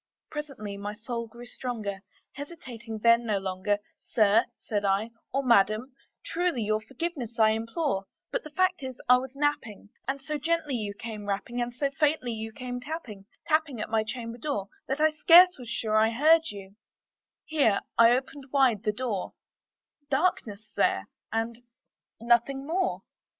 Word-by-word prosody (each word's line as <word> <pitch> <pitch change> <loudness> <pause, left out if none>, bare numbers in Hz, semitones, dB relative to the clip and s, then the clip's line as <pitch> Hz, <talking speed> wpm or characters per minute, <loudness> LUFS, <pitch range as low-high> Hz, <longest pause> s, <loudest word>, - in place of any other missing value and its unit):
Presently 265 -10 -6
my 205 +1 -5
soul 235 +1 -4
grew 235 +2 -12
stronger; 220 -6 -4 0.3
hesitating 255 -6 -8
then 235 0 +6
no 215 -3 0
longer, 190 +1 -1 0.2
"Sir," 215 0 +3
said 205 -2 -2
I, 200 +3 +1 0.2
"or 275 +1 0
Madam, 230 +1 +3 0.3
truly 340 -8 0
your 215 +1 0
forgiveness 260 -2 -5
I 220 -1 +5
implore; 225 - -1 0.3
But - - -1
the 305 - -9
fact 365 +2 +1
is 260 -2 -6
I 250 0 +8
was 260 +1 -6
napping, 275 -9 -2 0.2
and 270 +1 -1
so 295 +2 -4
gently 320 -1 0
you 210 -4 -3
came 215 -1 -7
rapping, 205 +5 -2
And 240 0 -2
so 275 +3 -1
faintly 290 -3 +1
you 220 0 -5
came 245 +1 -6
tapping 250 -10 -7 0.2
tapping 310 -6 +1
at - - -4
my 220 -1 +2
chamber 230 +1 -6
door, 210 -8 -2 0.2
That 270 +2 -1
I 310 0 +5
scarce 345 +2 +7
was 245 -2 -8
sure 220 -2 -1
I 220 +1 +5
heard 315 +7 +4
you;" 200 0 -10 0.7
here 280 -10 +2
I 230 0 +7
opened 265 +3 -1
wide 260 -7 +4
the 215 -1 +1
door: 210 -4 -3 0.8
Darkness 240 - 0
there, - - +1 0.2
and 225 +1 -2 0.6
nothing 240 +4 +2
more. 360 +4 -1
240 Hz, 160 wpm, -28 LUFS, 215-280 Hz, 0.8 s, I